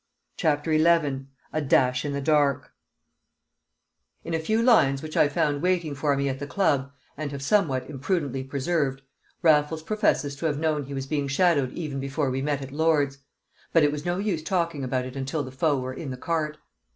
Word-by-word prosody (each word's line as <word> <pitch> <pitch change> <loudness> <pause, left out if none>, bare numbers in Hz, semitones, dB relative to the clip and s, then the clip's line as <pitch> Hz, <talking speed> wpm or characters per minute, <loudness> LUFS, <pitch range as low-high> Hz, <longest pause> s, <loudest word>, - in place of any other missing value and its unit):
CHAPTER 155 -1 +1
XI 155 -4 +2 0.3
A 155 - 0
Dash 130 -2 +2
in 145 -1 -3
the 140 - -2
Dark 145 -2 +2 1.5
In 170 - -5
a 160 - +1
few 220 +8 0
lines 140 - +4
which 155 0 -7
I - - +5
found 145 0 0
waiting 175 -4 +1
for 140 0 0
me 140 0 0
at 135 -1 -2
the 145 - -5
club, 145 -7 +1 0.2
and 145 -1 -4
have 140 -1 -6
somewhat 135 -8 +1
imprudently 145 -2 -2
preserved, 135 0 -1 0.4
Raffles 155 0 +3
professes 180 -8 0
to 165 - -1
have 145 -2 -1
known 155 -2 0
he 140 +1 -6
was 135 0 -3
being 145 0 -1
shadowed 140 -3 +2
even 150 -5 -4
before 135 0 -1
we 130 +1 -2
met 145 -1 -1
at 135 - -8
Lord's: 145 -2 +1 0.5
"but 165 - +5
it 145 - +4
was 150 0 -4
no 175 +1 -1
use 195 -5 -1
talking 170 -3 -1
about 130 0 -1
it 130 +1 -8
until 135 +3 -2
the 130 - -8
foe 145 +2 +1
were 130 0 -4
in 140 +2 -6
the 130 - -5
cart." 155 +1 -2
145 Hz, 195 wpm, -26 LUFS, 135-160 Hz, 1.5 s, I